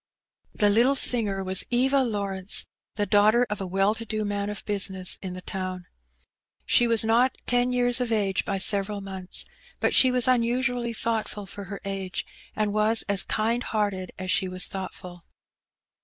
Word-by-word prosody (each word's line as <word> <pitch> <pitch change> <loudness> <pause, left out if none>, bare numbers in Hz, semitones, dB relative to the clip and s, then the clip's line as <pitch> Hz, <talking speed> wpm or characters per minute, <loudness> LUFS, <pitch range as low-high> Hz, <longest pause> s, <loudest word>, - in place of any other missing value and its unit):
The 205 -1 +3
Utile 240 +6 +3
singer 210 -7 0
was 190 0 +2
Eva 260 +3 +2
Lawrence^ 200 -6 0 0.3
the 205 -1 -1
daughter 215 +4 +4
of 210 - -3
a 190 - -4
well 195 +3 +1
to 225 - -7
do 215 -1 -3
man 205 0 -2
of 210 - -6
business 190 -3 +2
in 185 -2 -6
the 185 - -9
town. 185 -1 -5 0.8
She 240 - +3
was 230 -1 +5
not 240 +3 +2
ten 245 0 +1
years 245 0 +1
of 245 -2 -2
age 200 -4 0
by 195 - -2
several 200 +1 +1
months, 190 -2 -2 0.3
but - - +1
she 260 - +6
was 250 -1 +2
unusually 245 0 0
thoughtful 220 -2 -2
for 200 +1 -9
her 200 +1 -7
age, 195 -1 -4 0.3
and 210 -1 -1
was 215 +2 +2
as 200 -2 +1
kind 230 +3 -1
hearted 205 -5 -2
as 185 0 -3
she 190 - +2
was 185 0 -1
thoughtful. 180 -2 -8
205 Hz, 170 wpm, -25 LUFS, 195-235 Hz, 0.8 s, she